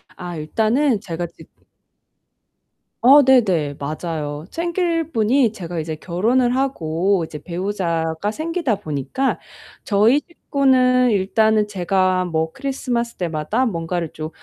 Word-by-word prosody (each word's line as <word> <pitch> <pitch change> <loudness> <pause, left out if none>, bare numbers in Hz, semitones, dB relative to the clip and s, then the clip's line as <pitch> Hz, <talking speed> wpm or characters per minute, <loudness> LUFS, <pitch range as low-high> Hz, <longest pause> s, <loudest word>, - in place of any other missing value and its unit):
아 175 -1 -7
일단은 220 - +1
제가 175 -3 -4
지금 - - -19 1.4
아 280 +4 +8
네네. 185 - +3
맞아요. 150 0 -4
챙길 335 -1 -1
분이 230 0 +2
제가 175 -4 -5
이제 160 0 -4
결혼을 235 +10 +1
하고 190 -8 0
이제 150 -2 -9
배우자가 170 -1 -2
생기다 315 -2 -1
보니까 150 - -2 0.4
저희 220 +7 +3
식구는 255 -6 +2
일단은 215 +1 +2
제가 185 -1 +1
뭐 160 -2 -1
크리스마스 250 - -3
때마다 165 +7 -1
뭔가를 170 -5 -2
좀 155 0 -5
200 Hz, 260 characters per minute, -20 LUFS, 165-255 Hz, 1.4 s, 아